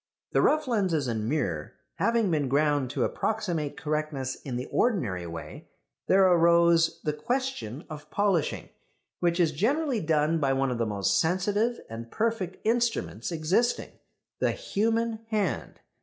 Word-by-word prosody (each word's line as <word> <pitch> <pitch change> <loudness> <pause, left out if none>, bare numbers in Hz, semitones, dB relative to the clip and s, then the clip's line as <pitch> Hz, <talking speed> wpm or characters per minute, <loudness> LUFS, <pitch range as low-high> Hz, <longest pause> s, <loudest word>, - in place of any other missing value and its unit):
The - - +3
rough 305 -1 +3
lenses 185 - +1
and 110 -2 -2
mirror 95 - -2 0.2
having 230 -4 +2
been 145 -4 0
ground 145 -1 +2
to - - -1
approximate 170 -9 -2
correctness 150 -4 -2
in 130 -3 -5
the 125 +1 -3
ordinary 110 - 0
way, 85 0 -8 0.4
there 195 +1 +5
arose 170 -1 +4
the 150 - 0
question 235 - -3
of 150 -1 -9
polishing, 200 -6 0 0.5
which 175 0 +1
is 165 -3 +3
generally 250 - 0
done 155 0 +2
by 135 -3 +2
one 135 -1 +1
of 120 - -3
the 115 - +1
most 100 -1 +1
sensitive 205 +7 +1
and 115 +1 -8
perfect 215 - -1
instruments 235 -4 0
existing 175 +9 0 0.5
the - - +2
human 230 - -1
hand. 210 -7 -2
165 Hz, 140 wpm, -27 LUFS, 135-215 Hz, 0.5 s, there